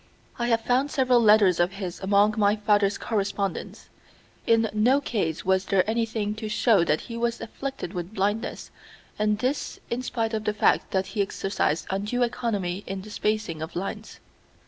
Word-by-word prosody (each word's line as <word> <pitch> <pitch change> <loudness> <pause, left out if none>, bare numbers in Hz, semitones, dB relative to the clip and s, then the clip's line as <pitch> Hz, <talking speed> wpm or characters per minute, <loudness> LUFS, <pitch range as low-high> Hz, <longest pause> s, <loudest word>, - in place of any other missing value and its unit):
I 240 - 0
have 230 -1 +2
found 255 +5 +1
several 255 -3 +3
letters 210 -5 +5
of 175 +2 +2
his 190 -3 -6
among 200 +2 +3
my 205 -1 +3
father's 205 -1 +2
correspondence. 200 -3 -3 0.6
In 225 0 +4
no 240 +6 +4
case 200 - -2
was 190 0 +2
there 190 -1 +2
anything 220 -2 -1
to 220 -1 -5
show 215 -3 +3
that 155 -2 +1
he 230 - -8
was 235 0 -1
afflicted 270 -5 -6
with 180 +3 -5
blindness 205 +4 -2 0.5
and 210 0 +2
this 255 +6 -2
in 240 +2 -1
spite 230 -3 -2
of 215 0 -2
the 210 - 0
fact - - +2
that 190 0 0
he 210 - +1
exercised 195 -5 -1
undue 210 +6 0
economy 205 -6 -2
in 190 0 -5
the 215 - -11
spacing 210 -7 -2
of 160 - -6
lines. 210 +4 -5
210 Hz, 170 wpm, -26 LUFS, 195-230 Hz, 0.6 s, letters